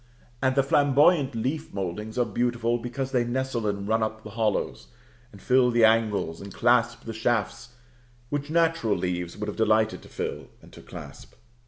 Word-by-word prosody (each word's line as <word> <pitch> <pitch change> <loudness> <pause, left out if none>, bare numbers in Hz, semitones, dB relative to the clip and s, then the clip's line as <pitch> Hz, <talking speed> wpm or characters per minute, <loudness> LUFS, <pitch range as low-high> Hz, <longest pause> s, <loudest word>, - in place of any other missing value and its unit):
And 130 -1 +2
the 135 - +4
flamboyant 145 +1 +3
leaf 135 +8 -3
mouldings 100 +4 -4
are 125 - +3
beautiful, 120 -1 0
because 125 +3 -4
they 125 -3 +2
nestle 120 -2 -2
and 100 -1 -2
run 110 +1 +1
up 110 0 -3
the 110 - -9
hollows, 105 - -1 0.4
and 100 - -14
fill 125 +4 +3
the 120 -1 +5
angles, 110 -7 +1
and 100 0 -8
clasp 120 +1 +2
the 115 - -6
shafts 115 +1 -2 0.5
which 145 0 -3
natural 165 -8 +2
leaves 90 -1 -3
would 105 0 -4
have 105 - -5
delighted 110 0 +2
to - - -15
fill - - -5
and - - -18
to - - -12
clasp. - - -11
115 Hz, 175 wpm, -26 LUFS, 110-130 Hz, 0.5 s, the